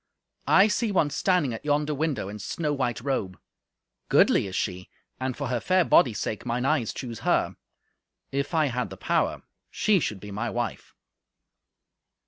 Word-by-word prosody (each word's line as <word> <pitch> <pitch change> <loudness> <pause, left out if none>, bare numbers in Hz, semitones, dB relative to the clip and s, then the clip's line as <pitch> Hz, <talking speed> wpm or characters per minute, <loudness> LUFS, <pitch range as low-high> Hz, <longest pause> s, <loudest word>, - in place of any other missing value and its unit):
I 195 +2 +6
see 215 +2 0
one 155 -6 +2
standing 155 -4 +1
at 110 - -7
yonder 150 0 +1
window 145 -7 -1
in 105 +1 -7
snow 150 +8 -2
white 125 -4 -1
robe. 115 -9 -2 0.7
Goodly - - +4
is 95 - -6
she, 90 0 -3 0.3
and 130 -1 -3
for 140 -3 -3
her 125 -2 0
fair 185 +6 +2
body's 120 -7 +4
sake, 110 - -3
mine 125 +1 -1
eyes 135 -6 +1
choose 120 -3 -6
her. - - +1 0.8
If 140 +4 -2
I 155 -1 +4
had 125 -4 -2
the 95 - -9
power, - - 0 0.3
she 210 -3 +2
should 105 - -3
be 105 +1 -9
my 110 +4 -2
wife." 120 -3 -4
130 Hz, 165 wpm, -26 LUFS, 115-150 Hz, 0.8 s, I